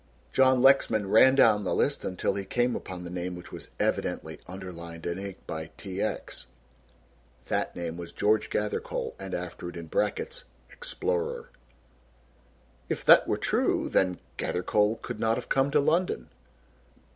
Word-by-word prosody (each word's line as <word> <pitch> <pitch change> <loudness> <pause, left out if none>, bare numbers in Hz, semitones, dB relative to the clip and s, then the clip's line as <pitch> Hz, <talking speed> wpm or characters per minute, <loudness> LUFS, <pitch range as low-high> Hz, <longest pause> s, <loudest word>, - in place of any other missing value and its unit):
John 130 -1 +4
Lexman 110 -7 +4
ran 130 +4 +7
down 110 -6 +5
the 95 - 0
list - - +1
until 90 - -1
he 100 0 -3
came 120 +5 0
upon 90 -1 -6
the 85 - -7
name 90 0 -4
which 90 - -11
was - - -9
evidently - - -1
underlined 85 -3 -8
in 85 +2 -2
ink 100 -1 -6
by 80 0 -5
T. 95 -1 -5
X. 110 - -4 1.0
That - - -1
name 85 -1 -4
was 85 -1 -7
George 110 +1 +1
Gathercole 105 0 -2
and 95 -1 -5
after 90 0 -5
it 90 - -9
in 85 - -6
brackets 105 +6 -2 0.3
(Explorer). 85 -8 -3 1.4
"If - - -3
that - - +8
were - - +1
true, - - +1
then, 90 -2 +2 0.2
Gathercole 105 +4 +1
could - - -5
not 115 0 +2
have 125 - -6
come 135 +1 +3
to - - +3
London." 170 +5 +1
95 Hz, 155 wpm, -28 LUFS, 90-110 Hz, 1.4 s, that